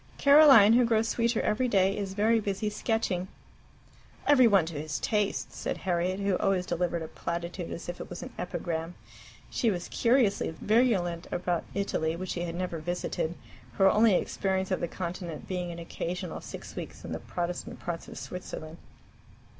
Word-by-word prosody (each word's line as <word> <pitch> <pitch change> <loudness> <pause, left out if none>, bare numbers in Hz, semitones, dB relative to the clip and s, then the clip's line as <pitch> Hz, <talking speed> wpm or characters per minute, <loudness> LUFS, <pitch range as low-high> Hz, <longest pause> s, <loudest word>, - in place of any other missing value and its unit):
Caroline, 280 -7 +8
who 245 +1 +6
grows 225 -1 +2
sweeter 235 0 +1
every 230 +4 +1
day, 195 -3 +3
is 195 -2 -4
very 225 +2 +3
busy 205 0 -2
sketching.'" 205 -5 -1 1.0
"Every 255 -4 +6
one 195 -6 +4
to 160 -3 -5
his 155 0 -3
taste!" 210 -2 -1
said - - -3
Harriet, 180 +1 -1
who 200 -2 +1
always 190 -2 +1
delivered 170 -1 -1
a - - -5
platitude 170 +2 -4
as 170 - -6
if 175 0 -5
it - - -8
was 175 - -7
an - - -9
epigram. 170 -1 -4 0.6
She 235 - +1
was 175 -4 -2
curiously 230 -9 +2
virulent 195 -7 +2
about 175 -1 -1
Italy, 165 -5 0
which 185 +2 -5
she 175 - -3
had 170 -1 -3
never 175 -2 -3
visited, 175 0 -2 0.4
her 195 -1 +5
only 215 -2 +5
experience 190 +1 -1
of 185 - +1
the 170 - -1
Continent 170 -2 -5
being 180 -2 -3
an 170 - -7
occasional 175 +2 -5
six - - -9
weeks - - -7
in - - -7
the - - -3
Protestant 175 0 -4
parts 170 -1 -5
of - - -9
Switzerland. 165 -3 -7
185 Hz, 170 wpm, -29 LUFS, 170-210 Hz, 1.0 s, Caroline